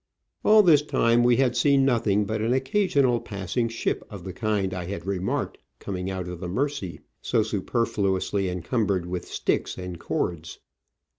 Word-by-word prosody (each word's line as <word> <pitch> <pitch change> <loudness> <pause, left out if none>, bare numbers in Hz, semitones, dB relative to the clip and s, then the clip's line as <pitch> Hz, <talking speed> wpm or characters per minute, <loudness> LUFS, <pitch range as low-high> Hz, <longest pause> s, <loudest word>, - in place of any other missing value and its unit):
All 215 0 +7
this 160 -6 +6
time 120 -5 +2
we 120 0 +4
had 125 -1 +2
seen 135 +2 +4
nothing 105 -5 +2
but 110 +1 -2
an 115 +3 +1
occasional 130 - +2
passing 100 +4 -2
ship 115 - -2
of 100 -5 -9
the 95 - -6
kind 100 -2 -1
I 90 -1 -4
had 95 -1 -6
remarked 95 -1 -2 0.2
coming 95 -1 -4
out 95 -2 -4
of 90 -1 -6
the 90 -1 -5
Mersey, 135 -2 -2 0.2
so 110 - +1
superfluously 100 -3 -1
encumbered 95 +1 -1
with 90 0 -5
sticks - - -1
and 90 -2 -6
cords. 85 0 -3
105 Hz, 160 wpm, -25 LUFS, 95-125 Hz, 0.2 s, All